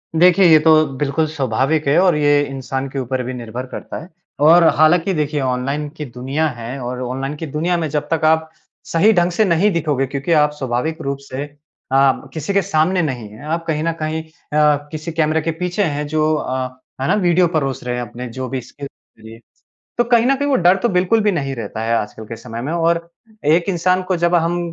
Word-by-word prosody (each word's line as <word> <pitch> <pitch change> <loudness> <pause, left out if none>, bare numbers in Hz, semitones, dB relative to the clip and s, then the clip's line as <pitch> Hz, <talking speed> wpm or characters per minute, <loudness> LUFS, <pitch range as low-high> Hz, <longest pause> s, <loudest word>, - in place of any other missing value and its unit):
देखिए 180 +3 +5
ये 160 -2 +7
तो 155 0 +5
बिल्कुल 150 +3 0
स्वाभाविक 140 +1 0
है 140 - +3
और 185 -4 +4
ये 145 -1 +3
इंसान 135 0 -4
के 135 0 -4
ऊपर 130 0 -2
भी 130 +1 -5
निर्भर 120 +1 -6
करता - - -6
है। 180 - -14 0.4
और 170 +1 +7
हालाँकि 170 +4 +3
देखिए 150 -2 -1
ऑनलाइन 135 +3 -2
की 150 - -4
दुनिया 135 +6 -2
है 120 +1 -7
और 125 +1 -4
ऑनलाइन 135 +3 -4
की 160 - -5
दुनिया 160 +5 -1
में 160 -2 -1
जब 150 0 -2
तक 165 - 0
आप 160 0 +2 0.4
सही 185 +7 +4
ढंग 175 -2 +2
से 215 +5 +2
नहीं 180 +4 +3
दिखोगे 150 -5 0
क्योंकि 140 +5 -3
आप 150 -2 +4
स्वाभाविक 135 +6 -2
रूप 140 -2 -3
से 140 0 -6 0.5
आप 135 0 +2
किसी 160 +6 -3
के 200 - +3
सामने 180 0 +1
नहीं 130 -8 -3
हैं 110 +7 -13
आप 165 +2 -2
कहीं 155 -1 -1
न 165 - +1
कहीं 155 +1 -2
अ, 150 -1 +1 0.2
किसी 155 +1 -5
कैमरे 155 0 +1
के 165 +2 -1
पीछे 180 +5 -2
हैं 150 -3 -2
जो 155 +1 +1
अ, 130 -3 -2 0.3
है 135 - 0
ना 185 - +3
वीडियो 175 0 +3
परोस 135 -7 -2
रहे 125 0 -2
हैं 125 - -3
अपने 120 +2 -7
जो 130 +2 -5
भी 130 -1 -3
स्क्रिप्ट 140 +3 -10 0.3
के - - -21
लिए। 115 0 -12 0.6
तो 240 - +4
कहीं 235 -1 +3
न 270 +2 +3
कहीं 285 +1 -2
वो 270 - +3
डर 180 +1 +4
तो 240 - +3
बिल्कुल 185 +4 +2
भी 210 - +3
नहीं 140 -6 -2
रहता 110 -1 -5
है 115 +1 0
आजकल 110 0 -4
के 115 - -6
समय 115 0 -7
में 145 +5 -3
और 170 0 0 0.4
एक 170 +5 +3
इंसान 180 +1 +1
को 185 0 -1
जब 170 +1 +2
हम 170 +1 +1
155 Hz, 225 wpm, -19 LUFS, 135-170 Hz, 0.6 s, ये